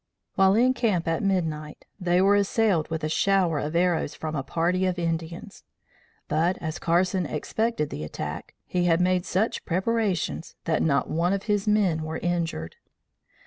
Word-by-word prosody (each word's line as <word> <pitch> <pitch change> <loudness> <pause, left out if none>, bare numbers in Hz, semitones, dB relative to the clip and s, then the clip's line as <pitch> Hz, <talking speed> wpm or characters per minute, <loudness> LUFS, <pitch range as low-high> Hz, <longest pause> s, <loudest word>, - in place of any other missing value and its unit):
While 190 0 +4
in 250 +3 +4
camp 215 -10 0
at 165 -1 0
midnight, 160 -6 -2
they 180 -1 +2
were 200 +1 +5
assailed 200 -4 +2
with 160 -1 -3
a - - +1
shower 175 -1 +2
of 150 +3 -3
arrows 170 -3 +1
from 155 0 -4
a 140 - -1
party 175 +6 0
of 180 -1 -1
Indians; 170 +3 -4 0.6
but, 165 +4 +1
as 160 0 -4
Carson 180 +1 +1
expected 220 +2 -2
the 75 - -5
attack, 75 - -6
he 180 -1 0
had 165 -1 +3
made 180 0 +1
such 200 +5 0
preparations 190 -2 -1
that 160 -2 0
not 140 -3 +2
one 170 +4 +1
of 195 -1 -2
his 205 -1 0
men 200 -7 +2
were 160 +1 -4
injured. 165 - -2
175 Hz, 165 wpm, -26 LUFS, 160-195 Hz, 0.6 s, were